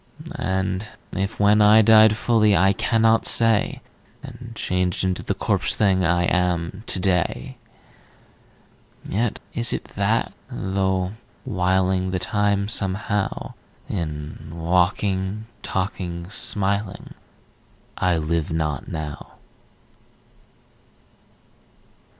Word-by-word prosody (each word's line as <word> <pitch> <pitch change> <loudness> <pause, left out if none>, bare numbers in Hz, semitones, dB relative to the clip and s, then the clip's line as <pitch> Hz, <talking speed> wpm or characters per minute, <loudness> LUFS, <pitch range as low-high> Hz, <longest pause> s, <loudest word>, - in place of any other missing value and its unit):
And 95 +2 -2 0.2
if 100 +3 -3
when 105 +1 +5
I 105 +1 +7
died 110 0 +6
fully 110 -3 +3
I 95 +1 +4
cannot 115 +3 +2
say, 115 -2 +2 0.4
And 120 -2 -10
changed 90 -3 -1
into 95 -1 -1
the - - -2
corpse - - 0
thing 95 -3 +2
I 85 +1 +2
am 90 +1 0
to - - -1
day, 90 -3 -1 1.5
Yet 110 +2 -1
is 120 0 +2
it - - -3
that, 105 +3 0 0.2
though 95 0 -1 0.3
whiling 95 -3 +1
The 95 - -1
time 100 +2 0
somehow 105 0 -1 0.3
In 75 -3 -5
walking, 95 +4 0 0.2
talking, 90 -3 -3
smiling, 100 0 0 0.8
I 90 -2 +1
live 80 0 -1
not 75 -4 -2
now. 75 -2 -6
95 Hz, 95 wpm, -23 LUFS, 90-105 Hz, 1.5 s, I